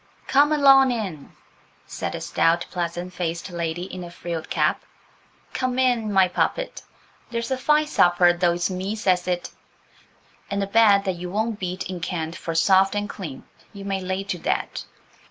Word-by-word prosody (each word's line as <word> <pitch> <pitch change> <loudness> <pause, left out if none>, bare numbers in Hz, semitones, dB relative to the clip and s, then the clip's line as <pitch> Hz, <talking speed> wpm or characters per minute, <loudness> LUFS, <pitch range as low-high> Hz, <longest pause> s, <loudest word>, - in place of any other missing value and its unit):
"Come 290 +2 +4
along 275 -3 +6
in," 195 - -5 0.5
said - - -5
a - - -6
stout, 170 +1 +1
pleasant 175 0 -4
faced 170 +1 -4
lady 170 0 -3
in 185 -1 -7
a 175 - -8
frilled 170 -2 -6
cap; - - +1 0.7
"come 255 -1 -1
in, 245 -4 +2
my 190 -2 +5
poppet. - - -2 0.5
There's 235 +2 -3
a - - +2
fine 300 +3 +3
supper, 175 -9 +4
though 175 0 +2
it's 175 +2 -1
me 190 +3 -3
says 185 -4 +1
it, 180 -1 -2 1.0
and 200 0 -1
a - - 0
bed 200 -1 +5
that 190 -3 -2
you 180 +1 -6
won't 220 +2 -2
beat 185 0 -4
in 185 -1 -5
Kent 170 -1 -3
for 165 -1 -5
soft 190 +3 +4
and 205 0 -1
clean, 165 -11 -7 0.3
you 200 -1 -9
may 195 -1 -2
lay 185 +1 -2
to 185 -3 -4
that." - - -2
185 Hz, 170 wpm, -23 LUFS, 175-215 Hz, 1.0 s, along